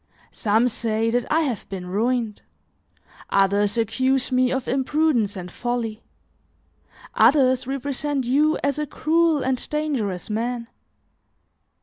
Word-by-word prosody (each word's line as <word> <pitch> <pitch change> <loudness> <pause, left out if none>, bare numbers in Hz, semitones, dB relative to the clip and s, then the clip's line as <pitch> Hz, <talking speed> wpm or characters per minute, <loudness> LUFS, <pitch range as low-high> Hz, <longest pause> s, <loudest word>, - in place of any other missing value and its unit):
Some 220 +3 +2
say 225 -1 0
that 245 0 -1
I 320 +2 +3
have 260 -9 -3
been 190 -2 -6
ruined; 225 +3 -1 0.9
others 200 +2 +2
accuse 260 +4 +1
me 255 0 +2
of 260 -1 -2
imprudence 265 -5 +1
and 180 -2 -7
folly; 235 -1 -3 1.1
others 260 -3 +4
represent 275 0 -2
you 295 +5 +2
as 280 +1 0
a 300 - -2
cruel 320 0 +1
and 260 -1 -2
dangerous 265 -12 -2
man. 235 +2 -3
250 Hz, 115 wpm, -23 LUFS, 220-275 Hz, 1.1 s, others